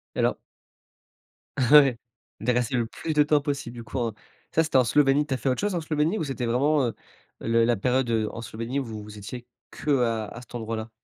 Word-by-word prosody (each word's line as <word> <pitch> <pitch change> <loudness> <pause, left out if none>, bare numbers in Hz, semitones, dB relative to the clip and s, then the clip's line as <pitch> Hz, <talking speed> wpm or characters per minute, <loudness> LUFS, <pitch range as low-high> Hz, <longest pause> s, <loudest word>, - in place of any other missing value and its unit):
Et - - -3
alors - - +2 1.2
Ouais, 135 -1 +6 0.4
de 125 +3 +1
rester 125 +2 0
le 120 -2 +1
plus 160 +6 -4
de 150 - +4
temps 150 0 +3
possible 140 -4 -3
du 120 - -7
coup 125 +3 -5
en 115 -3 -1 0.4
ça, 160 - +5
c'était 155 -4 +1
en 130 - +6
Slovénie, 140 +4 +3
tu 145 - -2
as - - 0
fait 130 - -1
autre 125 - 0
chose 205 -2 0
en 170 - -1
Slovénie, 155 +5 0
ou 160 - -1
c'était 135 -4 -3
vraiment, 140 +5 +2
heu, - - -3 0.5
le 115 0 +2
la 120 - +3
période, 125 +4 +1
heu, 110 -1 +1
en 115 - -7
Slovénie 115 +4 -4
où 135 - -3
vous 110 -2 -7
vous 105 0 -11
étiez 120 +4 -8 0.2
qu'à 120 -6 0
à 120 - -9
cet 125 - -16
endroit-là? 110 -1 -4
125 Hz, 230 wpm, -26 LUFS, 115-145 Hz, 1.2 s, Ouais